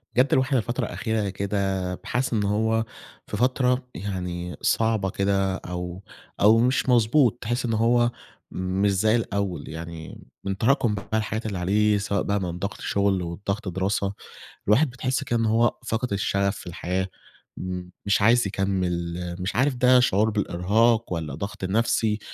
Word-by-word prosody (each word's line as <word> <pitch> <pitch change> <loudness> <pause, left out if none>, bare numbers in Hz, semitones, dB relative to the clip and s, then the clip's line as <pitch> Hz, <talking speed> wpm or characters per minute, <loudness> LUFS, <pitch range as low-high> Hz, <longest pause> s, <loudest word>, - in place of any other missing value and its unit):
بجد 130 +2 +4
الواحد 130 +1 +2
الفترة 120 +1 -1
الأخيرة 110 -3 -2
كده، 100 +2 -3 0.4
بقى - - -17
حاسس 125 +1 -1
إن 105 -2 +1
هو 110 +2 +1 0.4
في 105 - -4
فترة 125 +1 +1
يعني 90 -3 -4
صعبة 110 -4 +1
كده 95 0 +1
أو 90 0 -6 0.4
أو 110 +3 +7
مش 125 +2 +2
مضبوط، 120 +1 +4
تحس 120 +2 -1
إن 115 - 0
هو 120 +2 +3 0.4
مش 95 +2 0
زي 110 +4 +3
الأول، 100 -5 -2
يعني 80 0 -8 0.2
من 95 0 -2
تراكم 120 -1 +2 0.2
الحاجات 110 +1 -1
اللي 105 -3 -3
عليه 105 +4 +2
سواء 100 0 -1
بقى 100 0 0
من 90 -1 -4
ضغط 100 +3 -4
شغل 100 -2 +1
وضغط 100 +5 -4
دراسة، 95 +2 -1 0.5
الواحد 130 +9 +4
بتحس 130 +2 -2
كأنه 115 -4 0
هو 115 +2 +2
فاقد 115 0 -1
الشغف 100 0 0
في - - -11
الحياة، 90 +2 -2 0.5
امم، 90 -1 -5
مش 100 0 +2
عايز 115 +1 +4
يكمل، 90 -3 -2
مش 90 +2 -3
عارف 130 +3 +2
ده 125 +1 +5
شعور 110 -3 +3
بالإرهاق 105 +3 +1
والَّا 80 -5 -4
ضغط 100 +5 -6
النفسي، 110 +2 +1
105 Hz, 155 wpm, -25 LUFS, 95-115 Hz, 0.5 s, أو